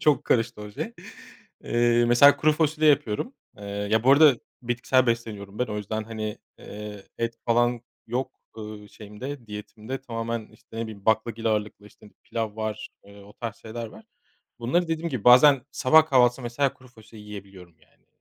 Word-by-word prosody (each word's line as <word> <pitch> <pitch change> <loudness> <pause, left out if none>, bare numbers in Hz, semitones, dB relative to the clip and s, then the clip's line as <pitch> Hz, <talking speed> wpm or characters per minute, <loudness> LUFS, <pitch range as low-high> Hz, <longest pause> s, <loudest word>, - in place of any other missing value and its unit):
Çok 150 -2 +3
karıştı 115 -2 +1
o 105 0 -8
şey. 220 - -5 0.7
Iıı, 120 0 +3
mesela 130 +4 +7
kuru 155 - +3
fasulye 155 0 +2
yapıyorum. 140 - -1 0.2
Iıı, 100 0 -5
ya 110 +1 +2
bu 130 - +6
arada 145 -2 +7 0.3
bitkisel 125 +2 +1
besleniyorum 110 -4 -3
ben 125 - +1
o 105 - -5
yüzden 110 +1 -4
hani, 110 -1 -5 0.2
ııı, 105 -1 -9 0.2
et 115 0 -2
falan 120 0 +2 0.3
yok, 125 +3 -4 0.2
ııı, 105 -1 -8
şeyimde 115 +6 -9
diyetimde 110 +4 -7
tamamen, 115 -2 -4
işte, 115 - -16
ne 115 - -2
bileyim 110 -3 -9
baklagil 110 +1 +1
ağırlıklı, 105 -1 -2
işte, 105 0 -18
pilav 110 -2 -4
var, 110 -1 -4 0.2
ııı, 100 0 -15
o 105 - -15
tarz 115 -1 -6
şeyler 115 +1 -7
var. 110 - -14 0.5
Bunları 165 +9 0
dediğim 165 +1 -2
gibi 125 -6 -4
bazen 125 +2 +7
sabah 145 +3 +5
kahvaltısında 125 -3 +3
mesela 130 +3 0
kuru 130 - -18
fasulye 110 -2 -15
yiyebiliyorum 95 -4 -11
yani - - -30
115 Hz, 170 wpm, -25 LUFS, 105-125 Hz, 0.7 s, mesela